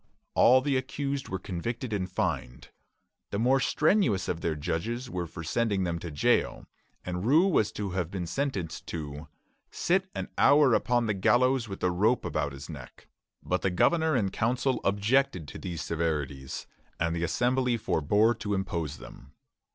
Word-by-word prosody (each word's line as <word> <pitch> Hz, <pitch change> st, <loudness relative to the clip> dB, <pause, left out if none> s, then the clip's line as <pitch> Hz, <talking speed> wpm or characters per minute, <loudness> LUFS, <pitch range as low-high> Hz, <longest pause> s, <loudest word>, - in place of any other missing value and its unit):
All 130 Hz, +2 st, +6 dB
the 135 Hz, 0 st, +1 dB
accused 140 Hz, +1 st, -3 dB
were 95 Hz, -, -2 dB
convicted 110 Hz, +6 st, -4 dB
and 95 Hz, -3 st, -2 dB
fined. 80 Hz, -, -3 dB, 0.6 s
The 100 Hz, -, -3 dB
more 125 Hz, +5 st, +3 dB
strenuous 135 Hz, -, +2 dB
of 85 Hz, -1 st, -2 dB
their 80 Hz, -2 st, -1 dB
judges 110 Hz, -, -3 dB
were 90 Hz, -2 st, -3 dB
for 85 Hz, +1 st, -8 dB
sending 100 Hz, +2 st, 0 dB
them 85 Hz, -2 st, -2 dB
to 85 Hz, -, -6 dB
jail, 75 Hz, -, +1 dB, 0.4 s
and 90 Hz, 0 st, -3 dB
Rous 160 Hz, -, +4 dB
was 110 Hz, -, +2 dB
to 100 Hz, -2 st, -4 dB
have 90 Hz, -3 st, -2 dB
been 95 Hz, -2 st, -4 dB
sentenced 95 Hz, -, -3 dB
to 75 Hz, -1 st, -6 dB, 0.4 s
"sit 190 Hz, +2 st, 0 dB
an -, -, -4 dB
hour 145 Hz, -4 st, +6 dB
upon 120 Hz, +1 st, +2 dB
the 110 Hz, -, +1 dB
gallows 120 Hz, +4 st, +2 dB
with 95 Hz, -, -7 dB
a 90 Hz, -, +3 dB
rope 105 Hz, +8 st, +2 dB
about 75 Hz, -, -1 dB
his 70 Hz, 0 st, -9 dB
neck;" 75 Hz, -7 st, -11 dB, 0.3 s
but 90 Hz, +1 st, -1 dB
the 95 Hz, -, +1 dB
governor 160 Hz, -, +2 dB
and 100 Hz, -6 st, 0 dB
council 125 Hz, +3 st, 0 dB
objected 100 Hz, -, +1 dB
to -, -, -8 dB
these 85 Hz, -3 st, -5 dB
severities, 75 Hz, -5 st, -3 dB, 0.3 s
and 85 Hz, 0 st, 0 dB
the 85 Hz, -, -2 dB
Assembly 125 Hz, +6 st, +1 dB
forbore 105 Hz, +2 st, +2 dB
to 105 Hz, -1 st, -1 dB
impose 85 Hz, -6 st, -3 dB
them. 65 Hz, +1 st, -13 dB
100 Hz, 165 wpm, -28 LUFS, 85-125 Hz, 0.6 s, All